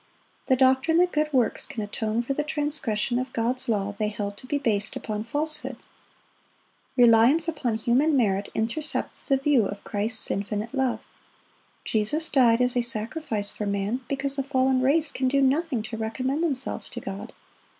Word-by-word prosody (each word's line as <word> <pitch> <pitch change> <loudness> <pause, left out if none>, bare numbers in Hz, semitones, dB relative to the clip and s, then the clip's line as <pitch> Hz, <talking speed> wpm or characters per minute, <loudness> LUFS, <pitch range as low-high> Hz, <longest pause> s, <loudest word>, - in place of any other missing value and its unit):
The 260 - +4
doctrine 260 +5 +3
that 360 +1 +3
good 305 0 0
works 250 -5 +2
can 220 - -5
atone 220 +2 -2
for 275 - -2
the 295 - -1
transgression 290 -7 -1
of 255 0 -4
God's 245 +2 -1
law, 205 -2 -1
they 215 - +1
held 205 -1 -4
to 255 - -10
be 290 - 0
based 215 -7 0
upon 215 0 -4
falsehood. 300 +6 -3 1.2
Reliance 245 +7 +6
upon 285 -8 -1
human 260 +7 +2
merit 200 -4 +1
intercepts 265 +8 -1
the 275 - +3
view 270 -6 +2
of 200 0 -8
Christ's 215 +2 0
infinite 205 +4 -3
love. 265 -3 -1 0.8
Jesus 265 +10 0
died 245 -3 +4
as 250 0 +1
a 245 - +3
sacrifice 225 -2 0
for 210 - -4
man 200 +5 -2
because 275 0 -1
the - - +1
fallen 260 -1 +1
race 295 +4 +3
can 260 - -1
do 275 +2 +2
nothing 275 -2 +1
to 225 +1 -6
recommend 255 +7 -2
themselves 270 -5 -2
to - - -6
God. - - -7
250 Hz, 170 wpm, -25 LUFS, 220-280 Hz, 1.2 s, Reliance